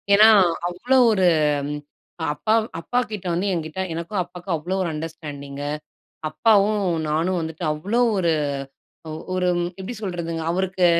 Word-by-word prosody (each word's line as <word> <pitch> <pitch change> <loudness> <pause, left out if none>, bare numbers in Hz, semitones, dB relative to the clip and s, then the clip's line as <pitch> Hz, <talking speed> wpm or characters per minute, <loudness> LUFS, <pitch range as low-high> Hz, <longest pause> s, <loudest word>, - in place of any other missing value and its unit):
ஏனா, 215 +2 +8 0.4
அவ்வளோ 245 +9 +1
ஒரு 190 -4 +3 1.1
அப்பா 215 +8 0
வ் - - -8
அப்பா 245 +9 0
கிட்ட 200 -3 -5
வந்து, 185 +4 0
என்கிட்ட 160 +1 -4
எனக்கும் 170 +4 -3
அப்பாவுக்கும் 175 0 -4
அவ்வளோ 185 +5 -3
ஒரு 170 - -1
அண்டர்ஸ்டாண்டிங்கு 145 -3 -6 0.6
அப்பாவும் 210 +2 +3 0.3
நானும் 170 +4 +1
வந்துட்டு, 160 +2 -5
அவ்வளோ 205 +11 0 0.2
ஒரு 170 -3 +2 1.0
ஒரு 180 -1 +1 0.3
எப்டி 210 +6 -5
சொல்றதுங்க? 170 -3 -3
அவருக்கு 185 0 +1
180 Hz, 125 wpm, -23 LUFS, 160-200 Hz, 1.1 s, ஏனா